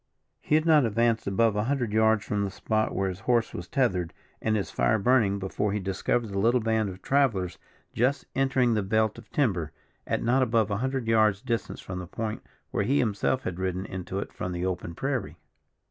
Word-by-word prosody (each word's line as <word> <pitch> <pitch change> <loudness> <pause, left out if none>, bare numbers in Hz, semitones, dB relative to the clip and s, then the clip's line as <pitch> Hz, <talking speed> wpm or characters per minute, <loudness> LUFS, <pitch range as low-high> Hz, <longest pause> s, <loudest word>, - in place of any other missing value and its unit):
He 150 - +1
had 155 +1 +3
not 155 -3 +6
advanced 115 0 +1
above 110 +2 +2
a 105 +1 0
hundred 125 -5 -1
yards 110 -1 +3
from 105 -1 -1
the 100 - -1
spot 110 +3 -1
where 95 - 0
his 95 0 -4
horse 115 +2 +1
was 85 - -6
tethered 90 - 0 0.3
and 110 0 +1
his 100 - -2
fire 110 - +2
burning, 110 -2 +3
before 100 +1 -2
he 105 - 0
discovered 100 +4 -1
the 100 -1 -2
little 120 +5 +3
band 110 -2 0
of 95 0 -10
travellers 110 -11 +1 0.3
just 130 +4 +1
entering 130 -3 +2
the 105 - +1
belt 110 +3 +1
of 115 - -17
timber, 95 - 0 0.4
at - - -1
not 125 +3 +3
above 115 -4 +2
a 100 - 0
hundred 130 +1 -2
yards 110 -2 +3
distance 115 -1 -2
from 90 -1 -6
the 90 - -7
point 110 +4 -4 0.3
where - - 0
he 140 +3 +2
himself 120 +3 0
had 90 0 -4
ridden 95 0 -2
into 95 0 -5
it 100 - -4
from 90 - -4
the 90 +1 -2
open 90 -2 -3
prairie. 135 -4 -3
110 Hz, 205 wpm, -27 LUFS, 95-120 Hz, 0.4 s, not